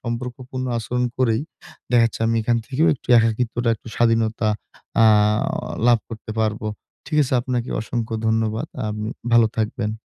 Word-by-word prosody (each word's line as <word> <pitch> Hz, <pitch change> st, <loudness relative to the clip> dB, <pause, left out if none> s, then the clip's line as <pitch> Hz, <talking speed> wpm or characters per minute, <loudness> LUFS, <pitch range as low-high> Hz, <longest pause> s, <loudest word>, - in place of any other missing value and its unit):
সম্পর্কপূর্ণ 125 Hz, +2 st, -5 dB
আচরণ 125 Hz, +2 st, -1 dB
করেই, 115 Hz, -3 st, +2 dB, 0.5 s
দেখাচ্ছে 115 Hz, -2 st, +3 dB
আমি 115 Hz, 0 st, +1 dB
এখান 115 Hz, +1 st, +2 dB
থেকেও 150 Hz, +7 st, +1 dB
একটু 130 Hz, -, -19 dB
একাকিত্বটা, 115 Hz, +1 st, 0 dB
একটু 110 Hz, -, -13 dB
স্বাধীনতা 115 Hz, -1 st, +2 dB, 0.5 s
আ -, -, +7 dB, 0.8 s
লাভ 120 Hz, -2 st, +6 dB
করতে 110 Hz, -1 st, -8 dB
পারব। 110 Hz, -1 st, 0 dB, 0.5 s
ঠিক 150 Hz, -2 st, 0 dB
আছে, 130 Hz, -, -1 dB
আপনাকে 125 Hz, -1 st, -2 dB
অসংখ্য 115 Hz, +1 st, -3 dB
ধন্যবাদ, 110 Hz, 0 st, 0 dB, 0.2 s
আপ 105 Hz, -, -3 dB, 0.4 s
ভালো 115 Hz, -1 st, +6 dB
থাকবেন। 110 Hz, 0 st, -1 dB
115 Hz, 135 wpm, -22 LUFS, 110-125 Hz, 0.8 s, আ